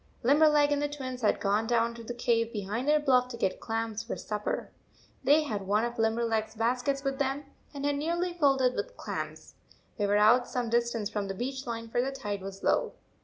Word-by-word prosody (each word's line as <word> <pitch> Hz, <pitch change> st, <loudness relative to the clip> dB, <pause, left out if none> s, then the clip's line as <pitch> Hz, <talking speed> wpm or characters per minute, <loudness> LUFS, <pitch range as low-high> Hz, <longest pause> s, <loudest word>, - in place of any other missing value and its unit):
Limberleg 295 Hz, +2 st, +5 dB
and 290 Hz, 0 st, +1 dB
the 290 Hz, -, +1 dB
Twins 260 Hz, -3 st, -6 dB
had 215 Hz, -, +2 dB
gone 210 Hz, +2 st, +1 dB
down 235 Hz, 0 st, +2 dB
to 235 Hz, 0 st, -10 dB
the 240 Hz, +2 st, -6 dB
cave 230 Hz, -1 st, +1 dB
behind 215 Hz, +4 st, -3 dB
their 300 Hz, 0 st, +5 dB
bluff 255 Hz, -4 st, +3 dB
to 245 Hz, -2 st, -7 dB
get 195 Hz, -4 st, -1 dB
clams 225 Hz, -1 st, -2 dB
for 225 Hz, -, -5 dB
supper. 210 Hz, -1 st, -3 dB, 0.5 s
They 295 Hz, +4 st, +5 dB
had 205 Hz, -9 st, -4 dB
one 210 Hz, +3 st, +2 dB
of 240 Hz, 0 st, -5 dB
Limberleg 225 Hz, 0 st, +1 dB
s 220 Hz, -, -18 dB
baskets 250 Hz, +5 st, 0 dB
with 275 Hz, -1 st, -2 dB
them, 280 Hz, +1 st, -1 dB, 0.3 s
and 280 Hz, -1 st, -5 dB
had 290 Hz, 0 st, +1 dB
nearly 345 Hz, +4 st, -1 dB
filled 280 Hz, -6 st, +3 dB
it 250 Hz, 0 st, +3 dB
with -, -, -4 dB
clams. -, -, -6 dB, 0.5 s
They 205 Hz, -, +2 dB
were 205 Hz, +1 st, +3 dB
out 230 Hz, +4 st, +5 dB
some 245 Hz, -3 st, -2 dB
distance 235 Hz, -2 st, 0 dB
from 205 Hz, -2 st, -2 dB
the 195 Hz, -, -4 dB
beach 265 Hz, +4 st, -4 dB
line, 230 Hz, -1 st, -4 dB
for 240 Hz, +2 st, 0 dB
the 265 Hz, +2 st, -1 dB
tide 205 Hz, -7 st, -4 dB
was 195 Hz, 0 st, -8 dB
low. -, -, +2 dB
240 Hz, 220 wpm, -29 LUFS, 220-275 Hz, 0.5 s, Limberleg